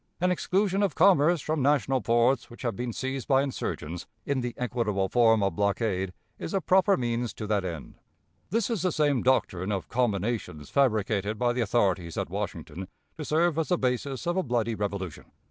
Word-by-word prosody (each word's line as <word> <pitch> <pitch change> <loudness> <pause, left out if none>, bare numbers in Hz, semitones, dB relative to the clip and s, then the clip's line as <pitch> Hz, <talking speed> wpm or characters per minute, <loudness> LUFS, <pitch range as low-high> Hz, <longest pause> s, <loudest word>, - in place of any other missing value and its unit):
An 180 +1 +2
exclusion 195 +2 +1
of 200 - +1
commerce 170 -3 +5
from 155 +1 -1
national 135 -2 +2
ports 120 +5 +2
which 120 - -12
have 120 -2 -1
been 120 0 -3
seized 130 +2 -4
by 135 -1 +4
insurgents, 90 - -4 0.2
in 140 -2 0
the 120 -1 -4
equitable 115 -6 -1
form 115 -3 +4
of 95 -4 0
blockade, 100 -2 0 0.3
is 170 - -4
a - - +3
proper 190 +3 +3
means 120 -1 -2
to 110 - -5
that 105 -2 0
end." 85 -6 -7 0.5
This 230 +1 0
is 220 -7 -1
the 185 - +1
same 145 -5 +2
doctrine 105 -7 +1
of 95 -2 -3
"combinations" 105 - -1
fabricated 110 -5 +1
by 120 +1 +1
the 125 - -1
authorities 95 -7 0
at - - -3
Washington 90 +5 -5 0.3
to 155 - -6
serve 165 +2 +1
as 160 - 0
the 180 - +3
basis 130 0 -2
of 175 0 0
a - - +3
bloody 120 -5 0
revolution. 100 -5 -4
120 Hz, 185 wpm, -27 LUFS, 105-145 Hz, 0.5 s, commerce